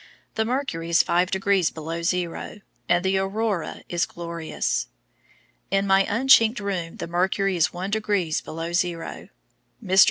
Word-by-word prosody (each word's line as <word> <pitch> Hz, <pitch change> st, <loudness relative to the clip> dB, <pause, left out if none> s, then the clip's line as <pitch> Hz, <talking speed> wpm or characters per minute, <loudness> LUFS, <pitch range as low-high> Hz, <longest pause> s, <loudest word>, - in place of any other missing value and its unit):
The 220 Hz, -, 0 dB
mercury 230 Hz, -10 st, -2 dB
is 170 Hz, -, +5 dB
5 180 Hz, +1 st, +2 dB
degrees 190 Hz, -2 st, +2 dB
below 165 Hz, +1 st, -5 dB
zero, 180 Hz, +3 st, -2 dB, 0.3 s
and 175 Hz, +1 st, +3 dB
the 190 Hz, 0 st, +2 dB
aurora 195 Hz, -2 st, -2 dB
is 175 Hz, 0 st, 0 dB
glorious. 170 Hz, -, -3 dB, 0.8 s
In 195 Hz, +1 st, +1 dB
my 195 Hz, 0 st, +4 dB
unchinked 230 Hz, 0 st, +5 dB
room 185 Hz, -5 st, -3 dB
the -, -, -4 dB
mercury 190 Hz, +3 st, 0 dB
is 170 Hz, -, +2 dB
1 185 Hz, +3 st, -5 dB
degrees 205 Hz, -7 st, 0 dB
below 165 Hz, +1 st, -5 dB
zero. 175 Hz, -1 st, -2 dB, 0.6 s
Mr. 190 Hz, 0 st, +3 dB
185 Hz, 145 wpm, -24 LUFS, 170-200 Hz, 0.8 s, is